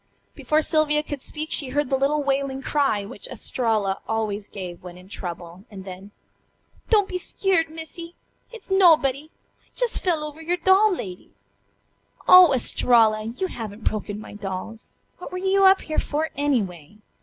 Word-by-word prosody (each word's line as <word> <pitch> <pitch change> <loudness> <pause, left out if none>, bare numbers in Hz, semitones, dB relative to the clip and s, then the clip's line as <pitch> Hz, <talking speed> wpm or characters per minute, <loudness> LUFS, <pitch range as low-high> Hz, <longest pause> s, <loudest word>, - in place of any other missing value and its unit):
Before 310 +1 0
Sylvia 300 -1 +2
could 290 -3 -6
speak 310 +3 -6
she 275 - +2
heard 290 0 -1
the - - +3
little 285 +2 0
wailing 270 -1 -2
cry 275 -10 0
which 200 - -8
Estralla 220 -5 -1
always 215 -2 -3
gave 180 -3 -8
when 180 -1 -11
in 180 +1 -15
trouble, 175 -1 -8
and 195 -3 -10
then: 190 +1 -10 0.8
"Don't 415 -4 +4
be 365 - -4
skeered, 360 -3 0
Missy! 330 +2 -9 0.4
It's 465 -4 -9
nobuddy. 310 -6 +4
I - - -39
jes' - - +3
fell 335 -5 0
over 300 +1 -8
your 345 +2 -1
doll 385 +4 +4
ladies." 185 - -8 0.8
"Oh, 365 -3 +9
Estralla! 225 -4 +3
You 235 +11 -4
haven't 220 - -7
broken 210 -1 -3
my 215 - -11
dolls! 205 +2 -7 0.3
What 360 - -9
were 365 - -5
you 385 +1 +2
up 385 0 +6
here 310 - -2
for, 310 +2 -2
anyway?" 210 - -2
275 Hz, 160 wpm, -23 LUFS, 210-320 Hz, 0.8 s, Oh